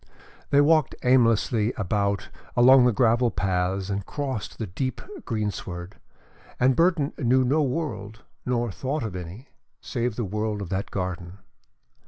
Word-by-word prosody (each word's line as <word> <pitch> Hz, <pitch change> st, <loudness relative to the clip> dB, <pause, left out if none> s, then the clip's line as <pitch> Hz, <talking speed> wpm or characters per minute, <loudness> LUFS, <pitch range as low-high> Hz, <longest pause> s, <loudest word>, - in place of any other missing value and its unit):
They 140 Hz, -, +5 dB
walked 155 Hz, -1 st, +3 dB
aimlessly 115 Hz, -2 st, +3 dB
about 100 Hz, 0 st, -1 dB, 0.3 s
along 125 Hz, +1 st, +7 dB
the 125 Hz, -, +4 dB
gravel 120 Hz, +1 st, +3 dB
paths 95 Hz, 0 st, -1 dB
and 100 Hz, 0 st, -1 dB
across 130 Hz, +2 st, -4 dB
the 110 Hz, -, -6 dB
deep 130 Hz, +8 st, -3 dB, 0.3 s
greensward, 100 Hz, -5 st, -4 dB, 0.6 s
and 130 Hz, +1 st, +4 dB
Burton 165 Hz, -3 st, +2 dB
knew 130 Hz, -1 st, +3 dB
no 140 Hz, +5 st, +2 dB
world, 120 Hz, -6 st, -3 dB, 0.2 s
nor 120 Hz, -2 st, -1 dB
thought 135 Hz, +7 st, -3 dB
of 110 Hz, -4 st, -5 dB
any, 90 Hz, +9 st, -8 dB, 0.3 s
save 120 Hz, -2 st, -3 dB
the 115 Hz, -, -2 dB
world 105 Hz, +2 st, -2 dB
of 100 Hz, -4 st, -6 dB
that 95 Hz, +1 st, -2 dB
garden. 90 Hz, -1 st, -4 dB
115 Hz, 140 wpm, -25 LUFS, 100-130 Hz, 0.6 s, along